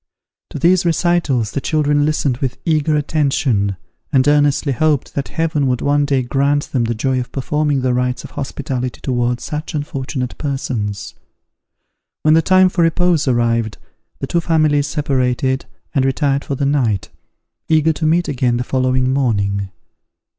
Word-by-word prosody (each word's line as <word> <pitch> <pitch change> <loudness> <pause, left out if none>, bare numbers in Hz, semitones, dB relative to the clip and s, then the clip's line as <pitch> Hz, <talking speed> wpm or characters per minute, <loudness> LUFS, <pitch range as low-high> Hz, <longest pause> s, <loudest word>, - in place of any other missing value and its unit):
To - - -6
these 175 +5 +3
recitals 165 - +1
the 140 - -3
children 145 0 +1
listened 145 -4 0
with 130 -1 -3
eager 155 -1 +2
attention, 135 - 0 0.4
and 135 -2 +3
earnestly 145 -1 +3
hoped 145 +1 0
that 140 - -3
Heaven 155 -4 0
would 125 -1 0
one 145 0 +2
day 135 -3 +1
grant 140 +3 0
them 125 -4 +1
the 115 +1 -1
joy 130 +3 0
of 125 - -5
performing 145 +1 0
the 125 -1 +1
rites 125 0 -1
of - - -10
hospitality 130 -3 -4
towards 120 -2 -1
such 155 +1 -5
unfortunate 135 -3 -4
persons. 125 -8 -3 1.1
When 155 - +5
the 165 - +5
time 185 +1 +4
for 180 - -1
repose 165 -2 +2
arrived, 115 -3 +1 0.4
the - - -4
two 170 - 0
families 155 -3 +2
separated 130 -2 0 0.3
and 135 - +2
retired 140 +1 +1
for 140 - -2
the 140 - -1
night, 125 -9 0 0.6
eager 160 0 +3
to 155 - -3
meet 170 +2 +2
again 125 -3 0
the 125 - -1
following 130 0 +1
morning. 100 -7 0
140 Hz, 155 wpm, -18 LUFS, 125-150 Hz, 1.1 s, When